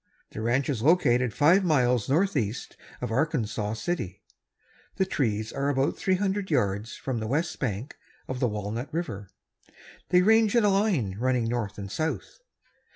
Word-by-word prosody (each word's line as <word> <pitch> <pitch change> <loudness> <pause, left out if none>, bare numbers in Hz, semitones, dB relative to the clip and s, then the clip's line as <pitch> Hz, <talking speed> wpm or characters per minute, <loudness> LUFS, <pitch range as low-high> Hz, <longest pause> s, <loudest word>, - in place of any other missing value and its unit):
The 110 - -6
ranch 125 +4 +1
is 130 -7 -1
located 125 -5 +3
five 170 - +4
miles 125 - +2
northeast 140 - 0 0.3
of - - -3
Arkansas 110 -5 -1
City. 115 - -4 0.7
The 190 - +1
trees 110 - -1
are 140 +1 -1
about 135 0 +1
three 190 - +1
hundred 195 0 -1
yards 105 -6 0
from 130 -4 -3
the 110 - -3
west 160 +7 -1
bank 120 +1 -3 0.3
of 130 -1 -4
the 125 - +2
Walnut 105 +5 -4
River. 115 - -4 0.8
They 180 0 +5
range 220 +1 +4
in 235 - +4
a 205 - +4
line 190 - +1
running 125 -1 +1
north 115 -3 -2
and 100 -1 -6
south. 160 - -3
130 Hz, 155 wpm, -27 LUFS, 110-170 Hz, 0.8 s, They